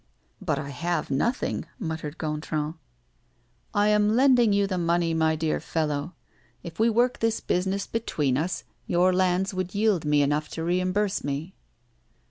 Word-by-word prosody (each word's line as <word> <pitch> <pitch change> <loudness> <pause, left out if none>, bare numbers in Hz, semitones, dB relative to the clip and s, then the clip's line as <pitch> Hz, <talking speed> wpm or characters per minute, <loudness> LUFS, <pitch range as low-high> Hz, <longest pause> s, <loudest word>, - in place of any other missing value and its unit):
"But - - 0
I 140 - -4
have 165 +3 -2
nothing," 235 - 0
muttered 160 - -5
Gontran. 150 0 -2 1.0
"I 205 0 +3
am 210 +1 +3
lending 250 -3 +5
you 200 0 +3
the 185 -2 -2
money, 170 0 +1
my 160 -1 +2
dear 155 0 -1
fellow. 155 +1 -2 0.5
If 170 0 -9
we 225 +1 +4
work 240 +3 +2
this 225 0 +1
business 190 +2 -1
between 150 - -1
us, 165 +6 -2 0.2
your 180 +1 +3
lands 185 +1 +1
would 185 +1 -3
yield 205 -5 +2
me 150 -1 +3
enough 150 +2 0
to 160 - -4
reimburse 185 +4 0
me." 145 +6 -3
175 Hz, 150 wpm, -26 LUFS, 155-205 Hz, 1.0 s, lending